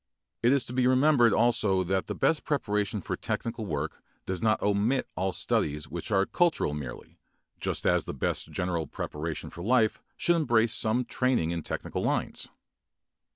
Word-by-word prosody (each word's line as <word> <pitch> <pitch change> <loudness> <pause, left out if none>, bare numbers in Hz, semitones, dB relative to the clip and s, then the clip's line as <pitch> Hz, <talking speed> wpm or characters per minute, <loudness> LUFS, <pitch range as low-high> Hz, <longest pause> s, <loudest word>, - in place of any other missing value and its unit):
It 120 +2 +4
is 140 -1 +3
to 125 - -6
be 125 0 +2
remembered 130 -2 +5
also 110 -5 +2
that 95 +1 -1
the - - -3
best 160 - +1
preparation 105 -7 -1
for - - -3
technical 115 -2 -3
work 75 -1 -3 0.2
does 95 -2 -3
not 110 -1 +2
omit 105 +6 +1
all 95 +1 0
studies 75 -3 -1
which 85 -1 -5
are 95 -2 +3
cultural 170 - +1
merely, 70 -5 -8 0.4
just - - -2
as - - +3
the - - -5
best 65 - -1
general 85 -3 -2
preparation 75 +3 -5
for 85 - -9
life 110 +2 +2 0.2
should 170 0 +3
embrace 120 -7 +2
some 120 +3 +1
training 125 -12 +1
in 85 -1 -2
technical - - -4
lines. - - -2
105 Hz, 165 wpm, -28 LUFS, 85-125 Hz, 0.4 s, remembered